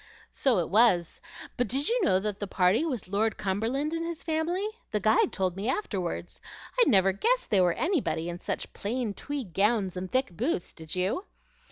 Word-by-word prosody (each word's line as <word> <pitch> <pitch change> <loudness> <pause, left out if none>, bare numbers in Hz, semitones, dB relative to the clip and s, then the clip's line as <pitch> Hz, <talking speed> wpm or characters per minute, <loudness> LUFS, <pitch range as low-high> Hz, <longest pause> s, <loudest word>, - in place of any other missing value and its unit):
"So 260 -6 +2
it 175 - 0
was; 195 -6 +3 0.4
but 245 - +1
did 270 +6 +1
you 475 -2 +2
know 190 - +4
that 210 0 -3
the 205 - -3
party 185 - +2
was 260 - -3
Lord 210 +3 0
Cumberland 230 +11 -1
and 330 0 -2
his 335 -1 -5
family? 335 +5 -1 0.2
The - - 0
guide 450 -4 +3
told 185 -2 -1
me 200 +5 -2
afterward. 190 - -3 0.5
I - - +8
never 195 -5 +5
guessed - - 0
they 200 -3 +5
were 175 -1 +3
anybody, 305 - 0
in 175 0 -5
such - - -4
plain 225 +1 -2
tweed 265 - -5
gowns 200 -1 +2
and 185 0 -5
thick 255 -9 0
boots; 240 - -1
did 160 0 -7
you?" 190 - -1
215 Hz, 190 wpm, -28 LUFS, 185-290 Hz, 0.5 s, I